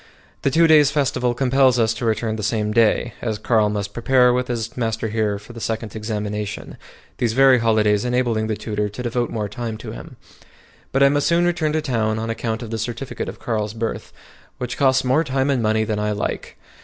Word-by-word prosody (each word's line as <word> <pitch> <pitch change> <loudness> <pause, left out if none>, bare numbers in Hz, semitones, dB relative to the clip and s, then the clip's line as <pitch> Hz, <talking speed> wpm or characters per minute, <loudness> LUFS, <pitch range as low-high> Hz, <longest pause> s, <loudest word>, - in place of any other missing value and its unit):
The - - +2
two 165 +5 +4
days' 155 -3 +6
festival 125 -4 0
compels 130 0 +3
us 115 -1 +2
to 115 +1 -5
return 110 0 0
the 110 - -5
same 105 0 -1
day, 115 0 +2
as 110 -3 -2
Carl 110 0 +2
must 100 -1 -3
prepare 125 +1 +3
with 125 0 0
his 115 -2 -4
master 110 -2 -2
here 105 -2 0
for 105 +4 -13
the 115 - -9
second 110 -1 -3
examination, 105 -1 -4 0.4
these 115 -2 +1
very 135 0 +5
holidays 110 -2 +2
enabling 120 -3 0
the 110 - -1
tutor 105 -1 -3
to 115 +5 -7
devote 120 0 -1
more 105 -2 -3
time 115 +1 -5
to - - -8
him; - - -10 0.8
but 135 +1 +3
I 140 - +7
must 145 0 +1
soon 170 +1 +3
return 165 -3 0
to 155 -1 0
town 110 -4 0
on 115 +1 -2
account 115 0 -3
of 115 - -8
the 115 - -3
certificate 120 +4 -4
of - - -9
Carl's 110 -2 -3
birth, 115 0 -4 0.5
which 125 0 -4
costs 130 -1 +3
more 130 +5 +2
time 135 -1 0
and 130 -3 +1
money 110 0 +2
than 110 -1 -2
I 105 0 0
like. 105 - -4
115 Hz, 210 wpm, -21 LUFS, 110-125 Hz, 0.8 s, I